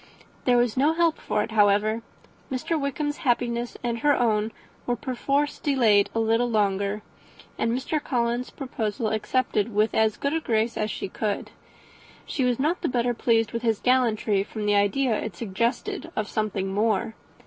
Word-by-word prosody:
There 245 -1 +4
was 240 -2 +2
no 285 +5 +3
help 335 -1 +2
for 210 - 0
it, - - -6
however. 215 +1 +3 0.5
Mr. 260 +6 -1
Wickham's 290 +1 -2
happiness 240 -2 -1
and 235 -1 -1
her 290 +3 +3
own 220 -2 +1 0.4
was 245 0 0
perforce 275 +4 -1
delayed 225 -8 +3
a - - +2
little 225 +2 +2
longer, 200 -1 0 0.5
and 230 - 0
Mr. 280 +5 -1
Collins's 240 -1 -1
proposal 230 -4 -3
accepted 220 -1 0
with 215 +1 +2
as 220 -1 +2
good 280 +1 -1
a 325 - +1
grace 230 -4 0
as 215 0 -1
she - - -4
could. 205 +2 -3 0.7
She 270 - -2
was 250 -2 +2
not 310 +6 0
the - - 0
better 245 -1 +1
pleased 225 -1 +1
with 230 - -3
his 225 -3 +1
gallantry, 230 -5 +2
from 210 +1 -5
the 205 - +3
idea 210 +5 +2
it 220 -5 -5
suggested 235 - -2
of 215 - -1
something 200 -3 -2
more. 220 +2 +1
230 Hz, 170 wpm, -25 LUFS, 215-255 Hz, 0.7 s, There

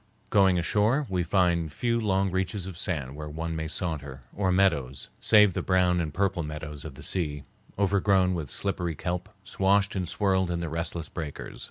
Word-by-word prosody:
Going 95 -3 +5
ashore, 105 - +2
we 90 -1 +1
find 85 -3 +2
few 115 +8 0
long 95 -2 +1
reaches 95 +1 -1
of 95 -2 -7
sand 75 -6 -3
where 75 0 -6
one 80 +2 -4
may 80 0 -3
saunter, 75 -6 -4
or 95 -2 +1
meadows, 85 -9 +1
save 105 -3 +5
the - - -1
brown 90 -2 +2
and 80 -2 -3
purple 95 +1 0
meadows 75 -1 -6
of 75 -4 -7
the - - -11
sea, 75 -6 -2 0.3
overgrown 95 -1 +3
with 80 -6 -4
slippery 90 -4 -2
kelp, 90 +3 -3
swashed 100 +1 +2
and 90 -3 -2
swirled 95 -3 +1
in 85 - -1
the 85 -1 -3
restless 80 0 -2
breakers. 75 -3 -7
90 Hz, 180 wpm, -27 LUFS, 80-95 Hz, 0.3 s, Going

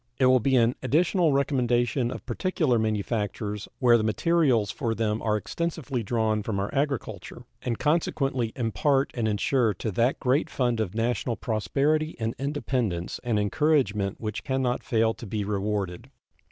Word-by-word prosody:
It 130 - +3
will 130 0 +6
be 130 +3 +2
an 120 -1 +4
additional 170 +5 +2
recommendation 125 -3 +1
of - - -7
particular 130 - 0
manufactures 105 -1 -2
where 120 -2 +5
the - - -1
materials 120 - +2
for 115 -3 -2
them 110 0 -1
are 110 -1 +1
extensively 145 -1 -3
drawn 110 -1 0
from 105 -1 -2
our 100 - -3
agriculture, 140 -2 -3 0.2
and 115 -2 -2
consequently 135 -6 0
impart 135 +4 +1
and 115 -3 -1
insure 110 +1 +1
to 110 - -3
that 115 +7 +1
great 130 +4 +1
fund 120 -3 0
of 105 -2 -2
national 120 +1 0
prosperity 140 - 0
and 115 0 -1
independence 125 - -2
an 120 -3 0
encouragement 105 -3 +1
which 110 -2 -4
can 135 -2 -1
not 125 -1 0
fail 115 -1 +2
to 115 - -10
be 105 +1 -2
rewarded. 100 -3 -2
120 Hz, 155 wpm, -26 LUFS, 110-135 Hz, 0.2 s, will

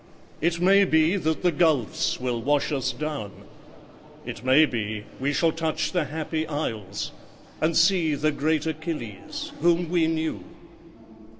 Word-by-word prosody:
It 170 +2 +1
may 195 +3 +5
be 160 0 +3
that 160 -4 -1
the 180 - +4
gulfs 150 -7 +1
will 125 -2 -2
wash 145 +4 +1
us 135 -4 0
down: 150 -9 -4 0.9
It - - -7
may 130 +5 +6
be 110 -5 -4
we 140 +2 0
shall 165 +3 +2
touch 155 -1 -2
the 175 -3 0
Happy 155 +2 -3
Isles, 110 -10 -4 0.5
And 160 +1 +2
see 165 -3 +3
the 155 +2 +1
great 155 +2 0
Achilles, 155 - -5
whom 170 0 +2
we 170 -2 +2
knew. 160 0 -2
155 Hz, 140 wpm, -25 LUFS, 140-165 Hz, 0.9 s, may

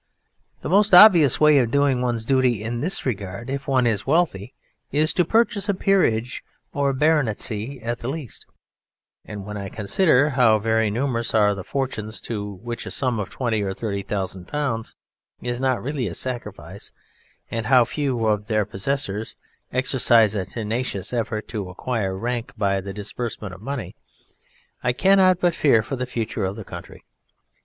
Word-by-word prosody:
The - - -3
most 200 +1 +5
obvious 175 - +8
way 150 -2 +6
of 120 -3 +1
doing 140 -1 +2
one's 120 -3 -1
duty 125 -4 +2
in 115 +2 -3
this 180 +9 -3
regard 105 0 -4
if 135 0 -4
one 130 -3 +2
is 110 -2 0
wealthy 135 - 0 0.4
is 155 +2 +1
to 180 - +3
purchase 220 +2 +1
a 200 - +2
peerage, 125 - +1 0.3
or 140 -1 +1
a - - 0
Baronetcy 130 -4 0
at 120 +1 -3
the 120 - -6
least, 140 -4 -6 0.8
and 100 -2 -8
when 105 0 -6
I 100 -1 -5
consider 145 - +2
how 120 -5 +4
very 110 0 +1
numerous 115 0 -1
are 105 -1 +4
the 100 -2 -6
fortunes 115 -3 -3
to 105 -3 -5
which 120 -1 -5
a - - -4
sum 125 -4 0
of 100 - -4
twenty 115 -5 -1
or 95 -1 -3
thirty 100 -3 -3
thousand 95 -2 -4
pounds 135 -7 -3 0.4
is 120 0 -4
not 130 -1 0
really 135 -3 -2
a 85 - -5
sacrifice, 100 -8 -5 0.6
and 115 -1 -3
how 125 -2 +5
few 130 -3 -2
of 105 -1 0
their 110 -2 +1
possessors 105 +1 -3 0.4
exercise 120 -4 +3
a 100 -3 -2
tenacious 110 -2 -3
effort 110 -2 -2
to 100 -5 -4
acquire 95 -1 -3
rank 120 +3 -3
by 100 -2 +1
the 100 +1 -7
disbursement 105 0 -5
of 95 - -12
money, 135 +1 -5 0.9
I 125 - +1
cannot 185 +3 +4
but 175 -2 +2
fear 125 -9 +3
for 135 - -4
the 125 0 -4
future 115 -3 -3
of 95 +1 -2
the 110 -2 -8
country! - - -10
120 Hz, 170 wpm, -23 LUFS, 105-135 Hz, 0.9 s, obvious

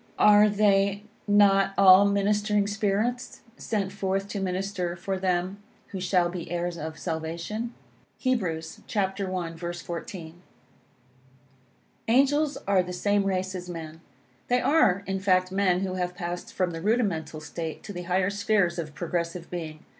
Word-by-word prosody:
"Are 210 0 +6
they 200 -1 +2 0.2
not 195 -1 +4
all 195 0 +8
ministering 205 +1 +2
spirits, 215 +5 -1
sent 205 -6 -2
forth 195 0 -2
to 205 - -3
minister 185 -1 -2
for 190 +2 -3
them 185 +1 -1 0.3
who 190 - -5
shall 180 -1 +2
be 175 -1 -6
heirs 175 0 -2
of 160 -1 -6
salvation?" 170 +9 -4 0.5
Heb. 255 -4 +2
i. 160 -2 -2 0.9
14. 170 0 -7 1.7
Angels 280 +5 +3
are 195 -1 +4
of 180 - +2
the 180 - -5
same 205 +2 +1
race 190 0 -1
as 180 -1 -6
men. 165 -1 -7 0.5
They 245 0 +3
are, 205 - +3
in 195 0 -2
fact, 185 -1 +2
men 190 -2 +2
who 190 -1 -2
have 180 -1 -2
passed 175 +4 -5
from 185 -5 -1
the 165 -1 -6
rudimental 185 -8 0
state 160 +1 -6
to 205 - -7
the 180 - -5
higher 185 +2 +2
spheres 200 -4 +1
of 155 -3 -6
progressive 170 0 -3
being. 160 -3 -6
190 Hz, 145 wpm, -26 LUFS, 175-205 Hz, 1.7 s, all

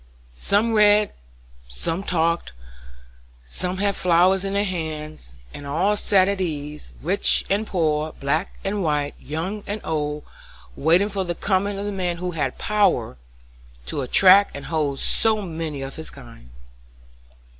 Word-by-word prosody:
Some 205 - +1
read, 210 -1 +4 0.5
some 65 - -3
talked, 170 - 0 0.9
some 180 - -2
had 200 0 0
flowers 180 +2 +3
in 195 0 -2
their 200 +1 +1
hands, 155 - -5 0.2
and 145 - -8
all 180 +9 +1
sat 195 -2 +3
at 200 -1 -1
ease, 150 -3 -5
rich 185 +6 +2
and 210 +2 +1
poor, 155 -3 0
black 155 +7 -2
and 200 +1 -2
white, 145 -2 0
young 185 +8 -4
and 205 +1 -3
old, 150 -1 -2 0.5
waiting 170 +7 +3
for 195 -2 -2
the 175 -1 -3
coming 200 +1 0
of 200 - -4
the 205 - -2
man 180 -3 -2
who 180 +1 -3
had 165 -3 -2
power 205 - +1 0.7
to 140 - -2
attract 190 +9 +5
and 140 - -7
hold 150 -4 -1
so 220 +7 +2
many 160 -5 -5
of 135 +3 -7
his 160 - -7
kind. 115 - -14
175 Hz, 145 wpm, -23 LUFS, 150-200 Hz, 0.9 s, attract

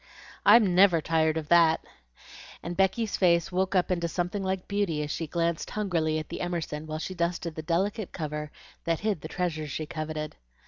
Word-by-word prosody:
I'm 205 -3 +7
never 180 -2 +6
tired 160 0 +1
of 155 -2 -4
that;" 165 -2 +5 0.8
and 175 +1 -4
Becky's 195 +3 +1
face 170 -1 +3
woke 190 +1 0
up 185 0 +2
into 170 -2 0
something 180 +4 -2
like 190 -1 -2
beauty 200 -7 0
as 150 - -4
she 165 - -3
glanced 170 0 -1
hungrily 170 -7 0
at 155 - -5
the - - -5
Emerson 160 -3 -3
while 155 0 -3
she 175 +4 -5
dusted 170 -1 -2
the 160 - -5
delicate 190 +5 -1
cover 150 -2 -4 0.3
that 165 -1 0
hid 210 -7 -1
the 155 - -6
treasures 160 -4 -2
she 155 +3 -3
coveted. 155 -1 -5
170 Hz, 185 wpm, -28 LUFS, 155-190 Hz, 0.8 s, I'm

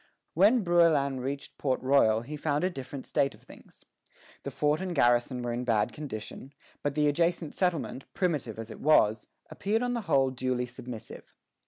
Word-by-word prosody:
When 210 +7 +4
Brouillan 160 -6 +3
reached 135 +2 -5
Port 130 -3 0
Royal 130 -5 +4
he 140 +6 -7
found 150 0 -1
a 185 - +1
different 135 -2 -7
state 140 - 0
of - - -23
things. - - -16 0.6
The - - -5
fort 150 +3 0
and 185 -2 -3
garrison 120 -1 +2
were 120 -1 -2
in 120 +1 -3
bad 115 -4 +1
condition; 135 -1 -7 0.3
but 145 -1 -2
the 150 -1 +3
adjacent 165 +1 0
settlement, 170 -7 -1
primitive 145 - -1
as 115 0 -7
it - - -10
was, 110 -8 +3 0.2
appeared 220 +4 -1
on 245 0 -1
the 235 - -2
whole 135 -1 +3
duly 125 -1 -1
submissive. 120 -2 -10
140 Hz, 175 wpm, -29 LUFS, 125-165 Hz, 0.6 s, When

